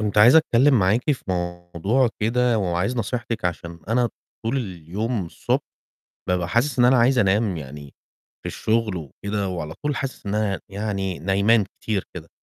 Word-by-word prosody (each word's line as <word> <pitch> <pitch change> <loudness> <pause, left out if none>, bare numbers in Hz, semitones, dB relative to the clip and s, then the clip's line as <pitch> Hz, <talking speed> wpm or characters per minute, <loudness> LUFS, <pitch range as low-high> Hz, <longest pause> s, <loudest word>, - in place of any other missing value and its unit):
كنت 105 -1 0
عايز 120 +8 +8
أتكلِّم 135 -2 +4
معاكِ 105 +9 +2
في 135 - -6
موضوع 90 +7 0
كده 120 +1 +2
وعايز 95 +5 -1
نصيحتِك 115 -1 -3
عشان 85 -1 -3
أنا 120 +1 +2 0.4
طول 115 +4 0
اليوم 100 - -3
الصبح - - -1 0.7
بابقى 90 -1 0
حاسس 125 +5 +1
إن 120 - +6
أنا 125 +1 +5
عايز 120 +2 +4
أنام 100 -1 +2
يعني 70 -1 -9 0.5
في - - -5
الشُغل 110 -3 0
وكده 100 +6 -4
وعلى 80 -4 -4
طول 145 -1 0
حاسس 135 -4 -5
إن 100 +1 -2
أنا 105 -3 0
يعني 95 -3 -3
نايمان 100 +6 +3 0.2
كتير 105 -4 -1
كده، 85 -2 -9
105 Hz, 160 wpm, -23 LUFS, 90-120 Hz, 0.7 s, عايز